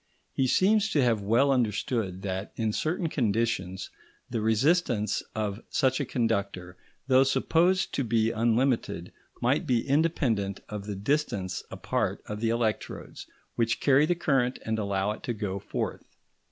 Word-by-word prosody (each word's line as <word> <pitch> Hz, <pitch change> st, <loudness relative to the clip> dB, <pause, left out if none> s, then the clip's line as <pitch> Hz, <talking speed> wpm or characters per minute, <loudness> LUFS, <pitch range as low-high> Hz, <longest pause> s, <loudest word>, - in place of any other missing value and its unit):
He 130 Hz, -, +1 dB
seems 210 Hz, -, +3 dB
to 145 Hz, -, +3 dB
have 115 Hz, -4 st, +2 dB
well 120 Hz, +8 st, +3 dB
understood 110 Hz, -5 st, -1 dB
that, 95 Hz, 0 st, -4 dB
in 110 Hz, -2 st, -1 dB
certain 165 Hz, -, -1 dB
conditions, 110 Hz, -, -1 dB, 0.4 s
the 115 Hz, -3 st, -1 dB
resistance 110 Hz, 0 st, +2 dB
of 105 Hz, 0 st, -2 dB
such 130 Hz, 0 st, +1 dB
a 140 Hz, -, -1 dB
conductor, 100 Hz, -6 st, -1 dB, 0.3 s
though 130 Hz, 0 st, +5 dB
supposed 170 Hz, +7 st, +2 dB
to 140 Hz, -, 0 dB
be 115 Hz, -1 st, +1 dB
unlimited, 120 Hz, +3 st, 0 dB, 0.3 s
might -, -, +2 dB
be 120 Hz, -3 st, +1 dB
independent 130 Hz, -, +1 dB
of 105 Hz, -1 st, -6 dB
the 105 Hz, -, -3 dB
distance 100 Hz, -5 st, -1 dB
apart -, -, -2 dB
of 105 Hz, 0 st, -5 dB
the 115 Hz, 0 st, 0 dB
electrodes 115 Hz, -2 st, -3 dB, 0.3 s
which 115 Hz, 0 st, 0 dB
carry 140 Hz, +2 st, +4 dB
the 175 Hz, -, +2 dB
current 135 Hz, -6 st, +1 dB
and 110 Hz, 0 st, -1 dB
allow 100 Hz, -1 st, 0 dB
it 105 Hz, -, -7 dB
to 120 Hz, -, -3 dB
go 100 Hz, -3 st, -3 dB
forth. -, -, -4 dB
115 Hz, 150 wpm, -28 LUFS, 105-135 Hz, 0.4 s, though